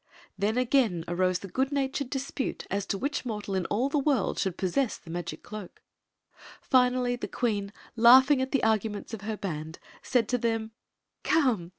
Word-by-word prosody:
Then 215 +4 0
again 240 -9 +2
arose 185 +1 +1
the 195 - -9
good 265 +8 -1
natured 275 -1 -1
dispute 270 0 -3
as 200 0 -1
to 195 - -1
which 280 +7 -2
mortal 210 -5 -4
in 185 -3 -1
all 235 +6 +1
the 285 +1 0
world 275 -7 +1
should 190 -2 -1
possess 215 +7 0
the 165 - -12
magic 175 +1 -5
cloak. 210 -4 -9 0.8
Finally 250 -1 +2
the - - -4
queen, 205 -5 -1 0.2
laughing 260 +4 +7
at 260 - -2
the 275 - +1
arguments 220 -1 0
of 220 - -5
her 215 +1 -4
band, 160 -5 -5 0.2
said 245 -4 +1
to 250 - +1
them: 225 -1 -1 0.3
" - - -55
Come 245 - +2
225 Hz, 180 wpm, -28 LUFS, 195-260 Hz, 0.8 s, laughing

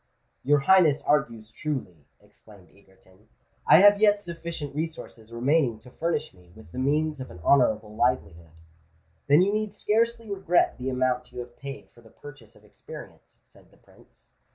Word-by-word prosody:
"Your 145 +1 +3
Highness 160 -2 +4
argues 115 -7 -1
truly," 115 - -6
exclaimed 100 -4 -19
Egerton: 95 +1 -25 0.4
"I - - +8
have 205 +1 +6
yet 205 -1 +4
sufficient 170 -5 -7
resources 150 -7 -7
remaining 125 0 +1
to 120 +3 -17
furnish 160 0 -3
me 90 -2 -21
with 110 -6 -16
the - - -6
means 150 +2 0
of 130 - -8
an 90 - -12
honourable 110 -5 +2
livelihood." 85 -8 -1 0.8
"Then 145 +5 +5
you 200 +2 0
need 215 -1 -2
scarcely 230 +1 0
regret 190 -7 0
the 130 +1 -3
amount 125 -1 -1
you 125 - -13
have 120 0 -12
paid 140 0 -10
for 120 - -20
the 115 - -18
purchase 135 -6 -14
of - - -21
experience," - - -13
said - - -21
the - - -25
Prince. - - -20
135 Hz, 165 wpm, -26 LUFS, 110-165 Hz, 0.8 s, I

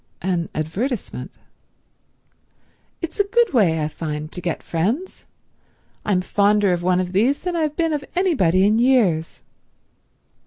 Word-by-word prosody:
"An 175 -2 -1
advertisement?" 195 - -3 1.7
"It's 335 +3 -5
a - - +6
good 465 -1 +1
way, 165 -10 +3
I - - 0
find, 155 -1 -5
to 180 - -6
get 170 -2 -3
friends. 220 - -2 0.8
I'm 190 -3 +1
fonder 205 0 +2
of 175 - -2
one 180 +1 +2
of 180 -1 -2
these 235 +9 +1
than 360 -1 -2
I've 310 -3 -1
been 330 -2 0
of 290 -2 -2
anybody 195 - +3
in 215 +2 +3
years." 220 -11 +2
200 Hz, 140 wpm, -21 LUFS, 175-285 Hz, 1.7 s, a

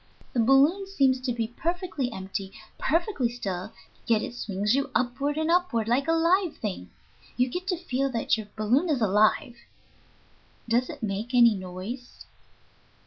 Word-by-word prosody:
The 245 - 0
balloon 280 - +4
seems 270 -9 +2
to 255 -1 -1
be 230 -2 -1
perfectly 325 - -3
empty, 190 0 -5 0.3
perfectly 330 - +1
still, 200 -4 -5 0.4
yet 220 -2 +3
it - - -5
swings 210 -2 -1
you 275 +1 +1
upward 275 +4 0
and 315 +1 +1
upward 340 -12 +1
like 255 +6 +1
a - - +3
live 335 +2 +2
thing. 185 - -5 0.5
You 250 +1 +3
get 360 +8 -5
to 365 -3 0
feel 275 -5 -1
that 235 -3 +1
your 220 -2 -6
balloon 245 +11 +2
is 290 -5 +1
alive." 215 +5 +2 1.1
"Does 240 +2 +1
it - - -8
make 215 +4 -3
any 235 -2 +7
noise?" 195 +7 -7
245 Hz, 155 wpm, -27 LUFS, 215-305 Hz, 1.1 s, any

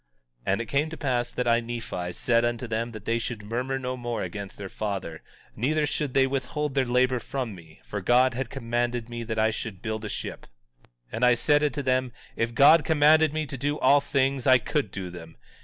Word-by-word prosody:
17:49 - - +3
And 100 +4 +1
it - - -4
came 145 +6 0
to 165 - -7
pass 125 -4 0
that 125 - -2
I, 115 0 +4
Nephi, 115 -7 -5
said 115 +4 +2
unto 120 +1 -1
them 115 +1 -2
that 110 -2 -10
they 115 +1 +1
should 115 -2 -5
murmur 125 +5 -2
no 130 -1 -3
more 120 -2 -3
against 100 +2 -6
their 100 - -6
father; 95 -6 -4 0.3
neither 150 +6 +1
should 145 -2 -3
they 135 -1 +5
withhold 135 +2 -2
their 135 -2 +1
labor 125 +1 +2
from 125 -3 -4
me, 80 -4 -15
for 105 - -5
God 125 +5 +4
had 125 0 -3
commanded 120 -1 -2
me 120 0 -5
that 110 -1 -4
I 110 0 +3
should 110 -3 -6
build 110 -1 -3
a 110 - -4
ship. - - -6 0.4
17:50 - - -27 0.2
And 115 +3 +1
I 125 0 +5
said 145 +5 +3
unto 145 -1 0
them: 130 -1 +1 0.2
If 115 0 -1
God 145 +5 +8
had 150 - -9
commanded 155 0 +5
me 155 0 -2
to 135 -1 -6
do 145 +2 -1
all 140 +2 +5
things 135 -2 0
I 130 0 +8
could 125 0 -1
do 95 -2 -6
them. 80 -2 -11
120 Hz, 225 wpm, -26 LUFS, 110-135 Hz, 0.4 s, God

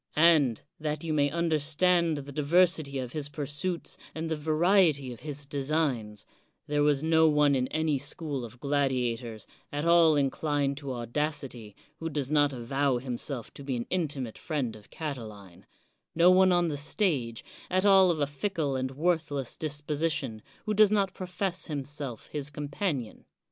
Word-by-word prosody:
And, 150 -7 +4 0.2
that 150 0 -3
you 160 -2 -2
may 145 -1 +3
understand 165 +1 +2
the 140 0 -7
diversity 155 0 +2
of 125 -2 -4
his 145 -1 -2
pursuits 150 +5 -4 0.2
and 160 0 -4
the - - +1
variety 155 -3 +2
of 120 - -12
his 145 -1 -6
designs, 140 -7 -2 0.4
there 145 0 0
was 145 -1 +2
no 160 0 +4
one 150 -1 +4
in 130 -1 +1
any 155 -2 0
school 145 -1 -2
of 120 +1 -10
gladiators, 125 -5 -1 0.3
at 145 +2 -2
all 170 -2 +6
inclined 140 0 0
to 140 -2 -5
audacity, 125 -3 -3 0.2
who 165 - -3
does 145 -3 -3
not 145 -1 +4
avow 135 +1 0
him 125 0 -4
self 130 -6 -5
to 140 - -10
be 135 -2 -2
an 120 - -3
intimate 145 -10 -2
friend 135 -8 -2
of 105 -1 -15
Catiline 105 - -7 0.2
— - - -49
no 170 +2 +6
one 185 0 +5
on 175 -1 +3
the 145 - -3
stage, 140 - -1 0.2
at 185 +2 +1
all 195 -2 +7
of 165 -3 0
a 145 - +2
fickle 145 0 -2
and 130 0 -1
worthless 145 -2 -1
dis 150 -2 -4
position, 145 -7 -2 0.2
who 215 - 0
does 210 -1 +5
not 200 -3 +1
profess 185 0 -3
himself 140 -5 -5
his 145 -1 -2
com 145 0 -6
panion. 140 - -3
145 Hz, 170 wpm, -28 LUFS, 135-160 Hz, 0.4 s, all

